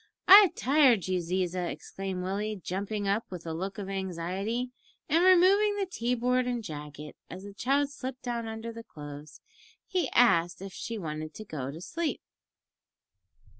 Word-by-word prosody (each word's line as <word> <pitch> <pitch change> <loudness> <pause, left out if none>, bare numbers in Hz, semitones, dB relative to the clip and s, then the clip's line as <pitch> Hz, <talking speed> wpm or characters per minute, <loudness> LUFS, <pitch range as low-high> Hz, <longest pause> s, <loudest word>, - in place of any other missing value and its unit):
"I've 395 -1 +9
tired 260 - +4
you, 185 -1 +1
Ziza," 180 0 -1
exclaimed 190 -2 -5
Willie, 205 +3 -2
jumping 200 +2 -3
up, 205 +3 0
with 180 -3 -8
a 165 - -3
look 190 +4 -4
of 200 -2 -5
anxiety, 195 +6 -3 0.4
and 330 +4 +3
removing 380 +3 +5
the 400 -1 -1
tea 250 -9 -1
board 250 +1 +1
and 240 -2 -2
jacket, 150 -3 -8
as 185 +3 -8
the 200 0 -9
child 275 +6 +1
slipped 260 -2 -7
down 235 -2 -3
under 225 +1 -5
the 230 - -8
clothes. 145 -3 -10 0.4
He 350 -8 -1
asked 175 -8 +3
if 195 0 -8
she 230 - -5
wanted 155 -3 -5
to 215 - -8
go 140 -8 -5
to 150 +4 -7
sleep. 330 - -3
205 Hz, 165 wpm, -29 LUFS, 180-250 Hz, 0.4 s, I've